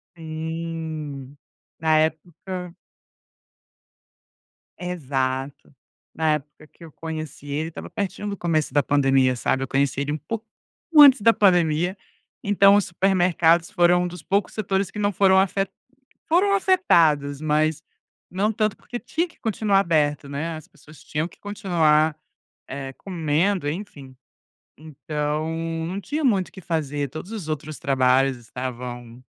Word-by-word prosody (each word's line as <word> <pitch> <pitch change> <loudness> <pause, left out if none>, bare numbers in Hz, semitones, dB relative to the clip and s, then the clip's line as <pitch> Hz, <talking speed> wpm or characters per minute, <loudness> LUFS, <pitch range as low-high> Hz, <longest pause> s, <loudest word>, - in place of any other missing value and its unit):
Sim. 160 -3 -6 0.4
Na 160 -1 +3
época 175 +3 -7 2.0
Exato. 135 -6 -3 0.4
Na 160 -1 +2
época 150 +1 -7
que 170 - -18
eu 165 - -11
conheci 155 -3 -7
ele, 150 +3 -2
estava 165 - -9
pertinho 200 +1 -4
do 200 - -4
começo 160 -4 0
da 145 - +3
pandemia, 135 -2 +3
sabe. 130 +2 0
Eu - - -4
conheci 140 +1 0
ele 145 +1 -2
um 150 - -1
po 220 +9 -5 0.5
antes 280 -5 +9
da 230 +2 +6
pandemia. 175 -2 +2 0.5
Então 200 0 +5
os 205 - +3
supermercados 175 -2 +2
foram 175 0 +4
um - - -1
dos 175 -1 -9
poucos 200 +4 0
setores 195 -2 -1
que 210 - -7
não 205 0 +1
foram 190 0 +4
foram - - +6
afe 195 0 0 0.6
foram 375 +5 +3
afetados, 165 - +3
mas 155 0 +1 0.5
não 195 +4 0
tanto, 215 -1 0
porque 245 - -7
tinha 325 +8 -2
que 340 - -24
continuar 215 -3 +1
aberto, 150 -5 +1
né. 155 +4 -4
As 155 0 -11
pessoas 155 -5 -18
tinham 155 +3 -3
que - - -21
continuar, 160 -7 +1 0.5
eh, 135 0 -6
comendo, 170 0 -1
enfim. 145 -6 -7 0.6
Então, 150 0 -3 0.4
não 185 +3 -4
tinha 300 +8 -3
muito 200 -9 +2
o - - -30
que 190 - -11
fazer, 145 -4 -2
todos 155 - -8
os 210 -8 -6
outros 155 0 -5
trabalhos 130 -1 +2
estavam, 120 0 -7
160 Hz, 140 wpm, -23 LUFS, 145-190 Hz, 2.0 s, antes